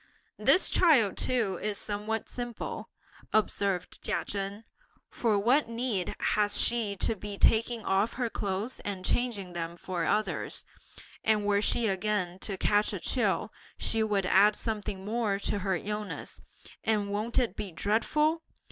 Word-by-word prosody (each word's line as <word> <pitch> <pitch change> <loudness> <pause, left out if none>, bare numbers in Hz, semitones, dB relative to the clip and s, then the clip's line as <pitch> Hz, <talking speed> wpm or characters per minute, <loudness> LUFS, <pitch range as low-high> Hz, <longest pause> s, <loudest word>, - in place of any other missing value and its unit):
"This 370 - +5
child 270 - +4
too 220 -8 0
is 210 -1 -1
somewhat 210 +2 -3
simple," 240 -2 -5 0.4
observed 200 -4 0
Chia - - -1
Chen; 200 +2 -4 0.5
"for 220 -4 +1
what 240 +5 +3
need 230 -6 -2
has 205 -1 +2
she 225 -4 +1
to 220 - 0
be 205 0 -7
taking 225 +1 +3
off 195 +4 +2
her 245 -1 -1
clothes, 205 +2 -2
and 195 -2 -5
changing 210 -7 -1
them 170 0 -4
for 175 -1 -3
others? 215 +5 -1 0.6
And 215 -2 +2
were 205 0 +3
she 235 +2 +2
again 190 -3 -1
to 195 -1 -4
catch 205 +2 +2
a - - -3
chill, - - 0 0.2
she 225 - +1
would 205 -3 +1
add 200 +3 +5
something 205 -4 -3
more 215 -2 0
to 200 0 -1
her 190 -1 0
illness; 210 +4 -5 0.4
and 210 -2 +1
won't 215 +3 -2
it 235 -6 +2
be 200 - -5
dreadful! 300 - +1
210 Hz, 145 wpm, -29 LUFS, 195-225 Hz, 0.6 s, This